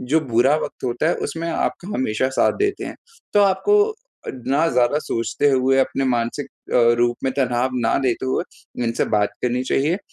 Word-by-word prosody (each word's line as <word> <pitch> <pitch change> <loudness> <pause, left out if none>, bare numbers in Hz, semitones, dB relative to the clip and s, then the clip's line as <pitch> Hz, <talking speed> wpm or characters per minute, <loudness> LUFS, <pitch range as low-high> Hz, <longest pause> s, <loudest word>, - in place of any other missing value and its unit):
जो 150 +6 +1
बुरा 130 +2 +2
वक़्त - - -8
होता 125 +6 0
है, - - +2
उसमें 165 +1 -4
आपका 175 +2 -2
हमेशा 130 0 0
साथ - - +4
देते 400 -1 -2
हैं। - - -7 0.4
तो 205 - +6
आपको 305 - +3
अ, 430 - -8 0.5
ना 145 +5 +2
ज़्यादा 125 +3 +2
सोचते 145 +3 0
हुए 135 0 +2
अपने 135 +1 0
मानसिक 120 +2 -1 0.3
अ, 120 -1 +5
रूप 120 0 +2
में 130 - 0
तनाव 125 -1 +1 0.2
ना - - +2
लेते 130 0 0
हुए 130 - 0 0.4
उनसे 115 +1 0
बात 105 - +1
करनी 125 +1 0
चाहिए 150 +8 +1
130 Hz, 185 wpm, -21 LUFS, 120-155 Hz, 0.5 s, तो